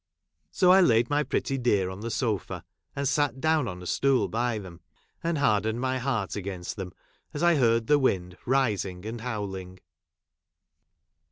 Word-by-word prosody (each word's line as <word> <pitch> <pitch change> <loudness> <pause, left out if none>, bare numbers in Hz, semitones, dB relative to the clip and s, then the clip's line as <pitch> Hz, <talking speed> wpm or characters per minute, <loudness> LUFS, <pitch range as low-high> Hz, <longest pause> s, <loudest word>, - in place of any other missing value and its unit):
So, 180 -1 +4
I 190 +1 +7
laid 120 -6 +3
my 145 +1 +3
pretty 135 -2 -1
dear 100 -7 +1
on 95 - -8
the 115 - -5
■ - - -3
sofa, 110 -6 -2 0.3
and 140 0 -1
sat 140 -2 +1
down 155 -3 +2
on 90 -3 -6
a - - -9
stool 135 +7 +2
by 120 0 -1
them, 95 -5 -9 0.4
and 165 -1 0
haixleued 110 -5 +2
my 130 +1 -1
heart 120 -7 -2
against 95 -3 -5
them 95 -3 -6 0.4
as 145 - -2
I 175 0 +5
heard 115 -5 +3
the 145 +4 +4
wind 90 -9 0
rising 105 -8 0
and 115 +1 -5
howling. 95 -6 -5
115 Hz, 170 wpm, -27 LUFS, 100-135 Hz, 0.4 s, I